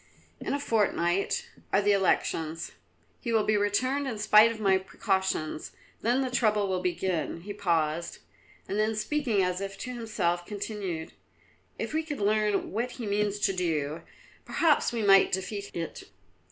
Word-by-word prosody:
In -, -, -2 dB
a -, -, -2 dB
fortnight 200 Hz, -7 st, +1 dB, 0.2 s
are 195 Hz, -, +4 dB
the 205 Hz, 0 st, +3 dB
elections; 165 Hz, -4 st, 0 dB, 0.5 s
he 235 Hz, -, -3 dB
will 220 Hz, -2 st, +3 dB
be 215 Hz, -, +2 dB
returned 255 Hz, +8 st, +1 dB
in 230 Hz, -4 st, -3 dB
spite 215 Hz, +1 st, +6 dB
of 225 Hz, -, -7 dB
my 195 Hz, -3 st, +3 dB
precautions; 190 Hz, -5 st, -2 dB, 0.3 s
then 245 Hz, +4 st, +2 dB
the 260 Hz, -1 st, -2 dB
trouble 215 Hz, -4 st, +2 dB
will 185 Hz, -1 st, -1 dB
begin." 175 Hz, -2 st, -1 dB
He 205 Hz, +3 st, -6 dB
paused, 170 Hz, -4 st, 0 dB, 0.5 s
and 200 Hz, -, -2 dB
then 215 Hz, +1 st, +1 dB
speaking 225 Hz, -3 st, +1 dB
as 180 Hz, +1 st, -1 dB
if 195 Hz, 0 st, -5 dB
to 250 Hz, +5 st, -5 dB
himself 195 Hz, -7 st, -1 dB
continued: 200 Hz, -4 st, -5 dB, 0.7 s
"If -, -, -4 dB
we 315 Hz, -, +2 dB
could 310 Hz, -3 st, -5 dB
learn 210 Hz, 0 st, +1 dB
what 240 Hz, +4 st, -2 dB
he 240 Hz, -, -6 dB
means 205 Hz, 0 st, 0 dB
to 195 Hz, -, +2 dB
do, 160 Hz, -4 st, -1 dB, 0.4 s
perhaps 320 Hz, -3 st, +2 dB
we 230 Hz, -2 st, -2 dB
might 195 Hz, -1 st, +6 dB
defeat 200 Hz, +2 st, -3 dB
it." 165 Hz, -1 st, -5 dB
205 Hz, 160 wpm, -28 LUFS, 180-220 Hz, 0.7 s, spite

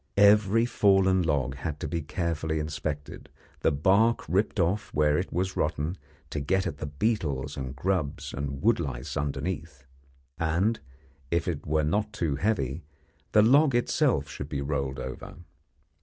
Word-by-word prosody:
Every 105 Hz, +2 st, +5 dB
fallen 95 Hz, -5 st, +3 dB
log 70 Hz, -6 st, 0 dB
had 75 Hz, +2 st, -4 dB
to -, -, -2 dB
be 85 Hz, -1 st, -2 dB
carefully 80 Hz, 0 st, -2 dB
inspected, 75 Hz, -1 st, -4 dB, 0.3 s
the -, -, +2 dB
bark 100 Hz, +11 st, +3 dB
ripped 95 Hz, +5 st, +1 dB
off 90 Hz, +4 st, 0 dB
where 75 Hz, 0 st, +3 dB
it 90 Hz, +5 st, -1 dB
was 95 Hz, +1 st, -1 dB
rotten 75 Hz, +5 st, -1 dB, 0.4 s
to 75 Hz, -, -2 dB
get 95 Hz, +7 st, +1 dB
at 70 Hz, -, -3 dB
the 75 Hz, -, -4 dB
beetles 75 Hz, -, -1 dB
and 65 Hz, -1 st, -5 dB
grubs 80 Hz, -1 st, -2 dB
and 70 Hz, +1 st, -4 dB
wood 115 Hz, -1 st, +4 dB
lice 65 Hz, -3 st, -4 dB
underneath, 75 Hz, 0 st, -3 dB, 0.5 s
and, 90 Hz, +8 st, +1 dB, 0.5 s
if 85 Hz, 0 st, 0 dB
it -, -, -3 dB
were 75 Hz, +1 st, +2 dB
not 105 Hz, +7 st, 0 dB
too 80 Hz, -9 st, -1 dB
heavy, 85 Hz, -, -1 dB, 0.5 s
the 105 Hz, -, +7 dB
log 135 Hz, +3 st, +5 dB
itself 120 Hz, -, +2 dB
should 70 Hz, +1 st, -7 dB
be 70 Hz, -, -3 dB
rolled 70 Hz, -2 st, -2 dB
over. 65 Hz, 0 st, -7 dB
80 Hz, 155 wpm, -27 LUFS, 70-95 Hz, 0.5 s, the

